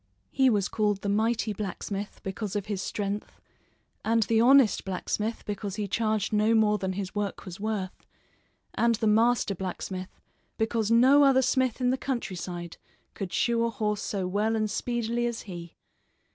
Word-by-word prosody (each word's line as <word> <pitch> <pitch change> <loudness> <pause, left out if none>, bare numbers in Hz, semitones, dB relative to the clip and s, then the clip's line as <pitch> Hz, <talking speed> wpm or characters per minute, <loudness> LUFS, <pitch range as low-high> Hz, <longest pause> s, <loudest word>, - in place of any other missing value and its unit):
He 265 -1 +4
was 205 -4 +2
called 210 -2 0
the 200 - -1
Mighty 220 +1 +1
Blacksmith 200 0 -5
because 195 +1 -4
of 205 -2 -1
his 205 -3 -3
strength, 205 +1 -4 0.6
and 225 0 +3
the 225 +2 +2
Honest 260 -2 +5
Blacksmith 210 +4 -3
because 205 -1 -4
he 210 -2 -2
charged 215 +1 0
no 215 +2 +3
more 210 -1 +3
than 190 -1 -2
his 190 -1 -4
work 205 -1 -3
was 185 -1 -8
worth, 205 -3 -4 0.7
and 235 0 +2
the 220 - -2
Master 225 0 +3
Blacksmith 185 0 -6 0.4
because 220 -1 0
no 255 +5 +6
other 265 -1 +5
smith 255 -1 +1
in 250 -1 +2
the 260 - -1
countryside 180 -9 -4 0.4
could 190 -3 -5
shoe 235 -1 +1
a 235 - +1
horse 215 -3 -2
so 195 -3 -2
well 210 +4 0
and 215 -1 0
speedily 240 +1 -1
as 235 -1 -4
he. 175 -4 -9
215 Hz, 165 wpm, -27 LUFS, 195-230 Hz, 0.7 s, no